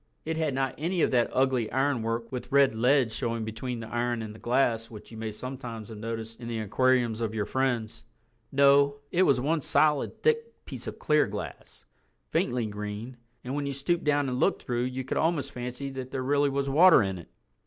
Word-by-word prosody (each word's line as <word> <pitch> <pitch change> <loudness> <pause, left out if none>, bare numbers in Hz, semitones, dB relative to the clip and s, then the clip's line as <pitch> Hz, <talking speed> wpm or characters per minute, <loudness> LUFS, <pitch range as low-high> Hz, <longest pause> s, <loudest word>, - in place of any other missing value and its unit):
It 160 +1 -2
had 155 -4 -1
not 135 -1 0
any 170 +2 0
of - - +2
that 120 -2 +3
ugly 130 -4 +1
ironwork 120 -4 0
with 125 -1 -6
red 140 -3 +5
lead 125 +1 +3
showing 115 -1 -2
between 115 +2 -4
the 110 - -7
iron 120 -1 -1
and 105 -1 -7
the 110 - -13
glass 120 -2 +1
which 110 -1 -12
you 115 - -9
may 110 -1 -3
sometimes 115 -2 -7
have 110 - -8
noticed 115 0 -5
in 115 - -7
the 115 -1 -3
aquariums 115 +1 +1
of 110 -1 -2
your 105 -2 -1
friends. 120 -4 -1 0.5
No, 140 0 +5
it 180 - +2
was 140 -8 +4
one 155 +5 0
solid 150 +1 +1
thick 460 0 0
piece - - -8
of - - -6
clear 150 -1 +3
glass, 105 +1 -8 0.5
faintly 120 -2 0
green, 105 +4 -6 0.3
and 125 - -4
when 145 0 -2
you 140 - -2
stooped 155 +6 -1
down 145 -1 +2
and 125 -1 -2
looked - - +1
through 120 0 -1
you 130 +1 -3
could 130 - -3
almost 155 -4 0
fancy 125 +2 -5
that 130 -1 -6
there 130 -1 -3
really 145 +2 +2
was 140 0 -1
water 160 0 +7
in 95 -2 -3
it. 85 - -13
125 Hz, 205 wpm, -28 LUFS, 115-140 Hz, 0.5 s, water